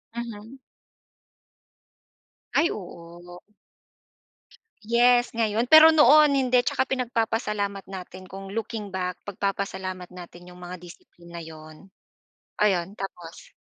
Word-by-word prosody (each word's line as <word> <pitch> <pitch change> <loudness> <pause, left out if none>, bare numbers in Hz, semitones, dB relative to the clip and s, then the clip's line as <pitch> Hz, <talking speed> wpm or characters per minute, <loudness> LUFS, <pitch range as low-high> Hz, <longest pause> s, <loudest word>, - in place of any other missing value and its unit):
Mhm. 235 +2 -8 2.0
Ay 335 - +3
oo. 175 -1 -10 1.4
Yes, 240 +1 +3
ngayon, 225 +1 0
pero 315 +2 +9
noon 300 -1 +6
hindi. 250 -1 +2
Tsaka 250 +1 -1
pinagpapasalamat 225 -5 -2
natin 185 0 -9
kung 195 0 -8
looking 210 -1 -5
back, 180 -1 -3
pagpapasalamat 190 -2 -4
natin 175 -1 -13
yung 180 0 -14
mga 180 0 -8
discipline 175 0 -16
na 170 - -6
'yon. 155 +3 -13 0.7
Ayon, 190 -1 0
tapos? 175 -4 -9
200 Hz, 100 wpm, -25 LUFS, 180-235 Hz, 2.0 s, pero